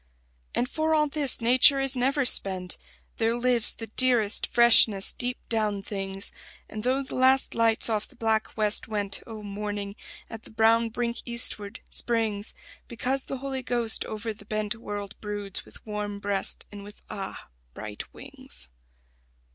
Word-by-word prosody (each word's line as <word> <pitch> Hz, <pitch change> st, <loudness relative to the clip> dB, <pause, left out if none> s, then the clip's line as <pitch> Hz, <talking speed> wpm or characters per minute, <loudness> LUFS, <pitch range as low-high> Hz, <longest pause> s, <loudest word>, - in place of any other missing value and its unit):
And 245 Hz, -, 0 dB
for 315 Hz, +2 st, 0 dB
all 300 Hz, -1 st, +2 dB
this, 285 Hz, -4 st, +3 dB
nature 255 Hz, +4 st, +6 dB
is 270 Hz, 0 st, +2 dB
never 270 Hz, +2 st, 0 dB
spent; 185 Hz, -5 st, +2 dB, 0.4 s
There 225 Hz, 0 st, 0 dB
lives 240 Hz, -2 st, +5 dB
the 225 Hz, -, -7 dB
dearest 230 Hz, -2 st, +1 dB
freshness 230 Hz, -4 st, +5 dB
deep 250 Hz, 0 st, -2 dB
down 210 Hz, -3 st, -1 dB
things; 195 Hz, -1 st, -1 dB, 0.4 s
And 215 Hz, -1 st, -8 dB
though 260 Hz, +3 st, 0 dB
the 265 Hz, -, -8 dB
last 260 Hz, +1 st, +3 dB
lights 230 Hz, -1 st, +4 dB
off 215 Hz, -2 st, -1 dB
the -, -, -21 dB
black 220 Hz, -2 st, -1 dB
West 210 Hz, -1 st, +1 dB
went 205 Hz, -2 st, -2 dB
Oh, 220 Hz, -2 st, -9 dB
morning, 205 Hz, 0 st, -5 dB, 0.3 s
at 225 Hz, -1 st, -9 dB
the -, -, -16 dB
brown 225 Hz, +1 st, +2 dB
brink 235 Hz, +1 st, -3 dB
eastward, 225 Hz, -3 st, 0 dB
springs 220 Hz, -3 st, -2 dB, 0.3 s
Because 255 Hz, +3 st, -3 dB
the 270 Hz, -, -5 dB
Holy 265 Hz, 0 st, -5 dB
Ghost 240 Hz, -3 st, 0 dB
over 220 Hz, +1 st, -5 dB
the 205 Hz, -, -17 dB
bent 215 Hz, 0 st, -2 dB
World 205 Hz, -3 st, -7 dB
broods 205 Hz, -2 st, -4 dB
with -, -, -17 dB
warm 210 Hz, -1 st, -5 dB
breast 200 Hz, -1 st, +3 dB
and 205 Hz, -1 st, -10 dB
with 205 Hz, +1 st, -14 dB
ah! 195 Hz, -2 st, -8 dB, 0.3 s
bright 105 Hz, -1 st, -8 dB
wings. 65 Hz, +1 st, -1 dB
220 Hz, 155 wpm, -26 LUFS, 205-245 Hz, 0.4 s, nature